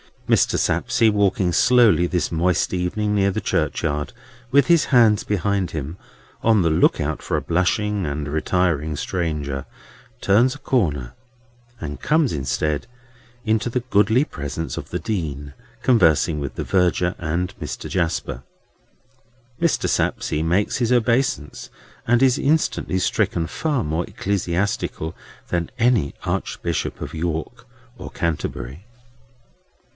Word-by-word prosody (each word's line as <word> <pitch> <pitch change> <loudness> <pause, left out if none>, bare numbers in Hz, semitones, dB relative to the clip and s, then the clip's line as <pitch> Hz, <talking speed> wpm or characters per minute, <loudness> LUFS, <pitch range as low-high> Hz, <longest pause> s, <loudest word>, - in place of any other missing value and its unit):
Mr. - - +3
Sapsea, 115 -4 +2
walking 100 -3 +1
slowly 110 -6 +4
this 90 0 -1
moist 85 +3 +1
evening 100 +4 -1
near 100 -1 +3
the - - -3
churchyard 75 +9 -1 0.4
with 140 +1 +4
his 170 -2 +4
hands 115 -5 +4
behind 100 -1 0
him, 80 +2 -5 0.4
on 110 -3 +4
the 85 - +2
look 80 - +3
out 75 +1 -2
for - - -2
a - - 0
blushing 95 +3 0
and 75 0 -3
retiring 80 -1 0
stranger, 75 -5 -3 0.6
turns 120 +7 +3
a - - -9
corner, 75 - -1 0.7
and 75 -2 -5
comes 155 -4 +2
instead 75 +1 -1 0.6
into 110 +1 +1
the 125 +1 -1
goodly 110 +6 +4
presence 75 - -5
of - - -6
the - - -2
Dean, 75 -9 -4 0.3
conversing 85 - +3
with 70 -2 -5
the - - -3
Verger 90 -1 +1
and 85 +3 -2
Mr. - - -5
Jasper. 85 -8 -2 1.2
Mr. 170 -2 +1
Sapsea 75 - 0
makes 90 +5 +1
his 120 -1 0
obeisance, 120 - 0 0.4
and 120 +2 +4
is 130 -2 +4
instantly 145 -9 +1
stricken 85 -2 0
far 145 - -1
more 80 +3 -1
ecclesiastical 95 -4 -2 0.4
than 85 -2 -1
any 115 - +2
Archbishop - - -3
of - - -6
York 85 +9 -4 0.3
or - - -8
Canterbury. 75 - -4
90 Hz, 130 wpm, -22 LUFS, 80-110 Hz, 1.2 s, slowly